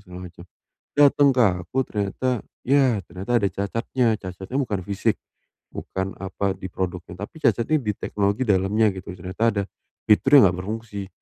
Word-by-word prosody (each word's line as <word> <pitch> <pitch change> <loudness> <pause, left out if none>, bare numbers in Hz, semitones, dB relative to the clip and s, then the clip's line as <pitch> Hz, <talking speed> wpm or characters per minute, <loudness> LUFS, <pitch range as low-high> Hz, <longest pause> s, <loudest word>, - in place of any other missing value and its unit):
segala 90 -2 -10
macam. 85 - -13 0.5
Dateng 145 0 +5
ke 125 -2 +3 0.2
aku 105 +10 -7
ternyata, 105 +5 -2 0.4
ya 135 -6 +4
ternyata 95 +7 -6
ada 100 - +1
cacatnya. 115 +6 -1
Cacatnya 95 +6 -6
bukan 105 -8 -1
fisik, 100 +2 0 0.6
bukan, 95 +1 -4
apa, 95 +1 -2
di 95 0 -6
produknya, 90 -1 -5
tapi 160 - -15
cacatnya 155 +1 +2
di 105 -5 -1
teknologi 100 +6 -1
dalamnya, 105 +1 +2
gitu. 95 0 -9
Ternyata 95 +5 -5
ada 100 - 0 0.4
fitur 135 +7 +4
yang 100 -10 +8
enggak 90 - -6
berfungsi. 105 -3 -5
100 Hz, 155 wpm, -23 LUFS, 95-120 Hz, 0.6 s, yang